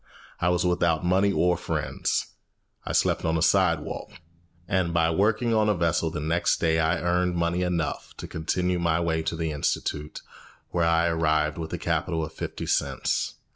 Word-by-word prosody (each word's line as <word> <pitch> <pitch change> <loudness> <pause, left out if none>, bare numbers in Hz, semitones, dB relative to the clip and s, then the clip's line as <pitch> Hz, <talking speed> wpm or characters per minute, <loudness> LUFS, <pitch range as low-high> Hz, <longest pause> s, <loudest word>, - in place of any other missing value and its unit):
I 90 - +2
was 90 0 +1
without 85 -2 +1
money 95 +3 +3
or 90 -2 +2
friends. - - -2 0.6
I - - -1
slept - - +1
on 80 0 +1
a - - -1
sidewalk; 85 -5 +1 0.6
and 90 -4 0
by 80 -1 +3
working 110 +6 +1
on 110 -1 +3
a 105 - +2
vessel 85 -1 +1
the 85 - -5
next 80 +3 +1
day 80 -1 +2
I 80 0 +2
earned 90 0 +1
money 85 +1 0
enough 90 -3 -2
to - - -7
continue 90 +3 -1
my 85 -1 +1
way 80 -1 0
to 80 - -2
the 80 -1 -2
institute, 75 0 -3 0.5
where 85 -1 +1
I 85 0 +3
arrived 80 -2 +1
with 80 -1 -5
a - - -1
capital 80 -1 -1
of - - -11
fifty - - -5
cents. - - -1
85 Hz, 175 wpm, -26 LUFS, 80-90 Hz, 0.6 s, money